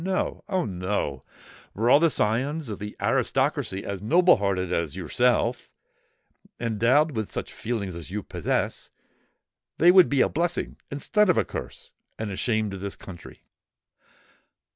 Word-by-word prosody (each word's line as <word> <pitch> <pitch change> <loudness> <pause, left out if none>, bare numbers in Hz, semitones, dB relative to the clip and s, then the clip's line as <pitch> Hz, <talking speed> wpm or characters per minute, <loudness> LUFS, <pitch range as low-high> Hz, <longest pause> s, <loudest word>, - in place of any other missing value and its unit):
No,—Oh! 185 -1 -1
no:—were 95 - -4
all 135 +4 +7
the 165 +1 +4
scions 135 +5 -1
of 105 - -5
the 105 0 -7
aristocracy 95 +1 0
as 100 -2 -4
noble 175 - +5
hearted 95 -3 -1
as 85 -5 -1
yourself—endowed 120 +7 -1
with 110 -6 -4
such - - -4
feelings 105 -6 -4
as 85 0 -8
you 105 +2 -4
possess, - - -2 0.9
they 175 +2 +7
would 185 -1 +7
be 140 -2 +2
a - - +4
blessing 170 +2 -2
instead 210 +9 +1
of 180 - +3
a - - +2
curse - - -8 0.3
and 110 -2 -4
a - - -4
shame 110 -1 0
to 95 - -5
this 100 +1 -5
country. 90 -3 -12
110 Hz, 140 wpm, -25 LUFS, 100-150 Hz, 0.9 s, all